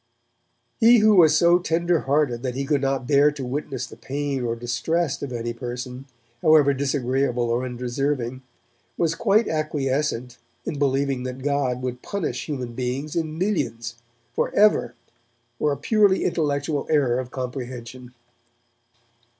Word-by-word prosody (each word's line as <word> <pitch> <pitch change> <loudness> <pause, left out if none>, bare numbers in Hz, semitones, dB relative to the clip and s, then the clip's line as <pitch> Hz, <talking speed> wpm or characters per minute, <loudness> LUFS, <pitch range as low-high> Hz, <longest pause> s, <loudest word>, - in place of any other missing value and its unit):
He 235 +1 +7
who 215 -1 +5
was 160 -4 +6
so 175 +1 +5
tender 170 0 +1
hearted 135 -4 0
that 125 -1 -3
he 135 +1 -2
could 145 -1 +1
not 135 -2 0
bear 145 +2 +5
to 140 -3 -6
witness 135 0 -3
the - - -12
pain 140 -1 -3
or 115 -1 -1
distress 130 +7 -1
of 140 - -4
any 120 -1 -3
person, 125 +2 -6 0.4
however 150 -3 +5
disagreeable 130 -3 0
or 120 +2 0
undeserving, 125 +1 -2 0.6
was 165 -2 +1
quite 210 +6 +2
acquiescent 140 -5 -1 0.3
in 145 - -4
believing 135 -1 +1
that 130 +1 -6
God 135 -3 0
would 125 -1 -4
punish 200 -5 -3
human 130 -6 -4
beings, 130 +4 -3
in 160 -2 -2
millions, 120 - -2 0.4
for - - 0
ever, 205 - +4 0.6
for 150 - +2
a 140 - -2
purely 205 - +3
intellectual 145 -3 -1
error 135 -5 +2
of 130 -1 -5
comprehension. 125 -1 -7
135 Hz, 140 wpm, -24 LUFS, 125-155 Hz, 0.6 s, He